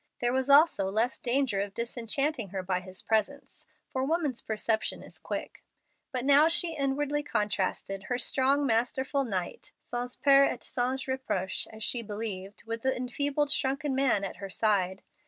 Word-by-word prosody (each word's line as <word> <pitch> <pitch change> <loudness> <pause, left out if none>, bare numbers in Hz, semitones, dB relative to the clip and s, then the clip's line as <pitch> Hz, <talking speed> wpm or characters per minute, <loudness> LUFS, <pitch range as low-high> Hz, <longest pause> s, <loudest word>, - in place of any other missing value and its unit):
There 240 0 +1
was 265 +1 0
also 285 - +6
less 225 +6 0
danger 245 -5 +1
of 200 -1 -5
disenchanting 240 +1 -1
her 190 0 -4
by 185 0 0
his 185 0 -10
presence, 225 +6 -1 0.3
for 260 - 0
woman's 300 -4 0
perception 220 0 -1
is - - -12
quick. - - -6 0.5
But 255 -1 -2
now 285 +3 +7
she 330 0 +2
inwardly 290 +1 0
contrasted 210 -5 -2
her 245 - -1
strong, 270 +3 +2
masterful 265 +3 +1
knight, 185 -6 -4
"sans 245 +1 -4
peur 275 -1 +6
et - - -3
sans 255 +2 -1
reproche," 260 -8 -2
as 220 0 -7
she 240 - -1
believed, 205 -3 -6
with 230 0 -4
the 265 +1 0
enfeebled, 285 +3 0
shrunken 275 +1 +1
man 260 -7 +2
at 195 - -5
her 195 0 -7
side. 190 -2 +1
245 Hz, 160 wpm, -29 LUFS, 210-275 Hz, 0.5 s, now